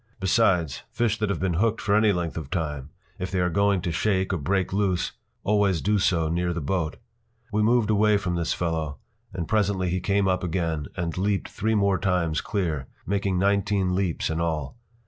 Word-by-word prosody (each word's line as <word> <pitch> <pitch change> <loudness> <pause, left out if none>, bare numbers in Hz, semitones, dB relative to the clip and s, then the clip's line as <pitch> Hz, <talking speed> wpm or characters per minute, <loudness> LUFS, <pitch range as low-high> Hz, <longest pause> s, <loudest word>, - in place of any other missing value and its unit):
Besides, 90 - +2
fish 115 -2 0
that 105 -2 0
have 100 - -1
been 95 -2 0
hooked 115 -1 +1
for 100 -1 +1
any 105 0 +5
length 85 -3 -2
of 80 -4 -5
time, 75 -5 -3 0.3
if 90 - -3
they 95 - -1
are 90 0 +1
going 100 +1 +2
to 85 - -2
shake 95 +2 0
or - - +1
break 95 +5 0
loose, 95 -3 +1 0.3
always 100 -3 +2
do 105 +3 +1
so 85 -4 +2
near 85 +2 0
the 85 - -3
boat. 80 +1 -2 0.5
We 105 +1 +1
moved 110 0 +3
away 105 0 +4
from 95 -3 -2
this 85 -1 -1
fellow, 80 -4 -2 0.3
and 90 -3 -4
presently 100 -4 +1
he 90 - 0
came 100 +2 +1
up 95 -1 +1
again, 80 -4 -1
and 85 -2 -2
leaped 100 0 0
three 110 +2 -1
more 100 -2 +2
times 90 -5 0
clear, 80 -10 -2 0.2
making 100 -1 0
nineteen 100 -1 +1
leaps 90 -4 -1
in 80 +1 -1
all. 80 - -2
95 Hz, 195 wpm, -25 LUFS, 85-100 Hz, 0.5 s, any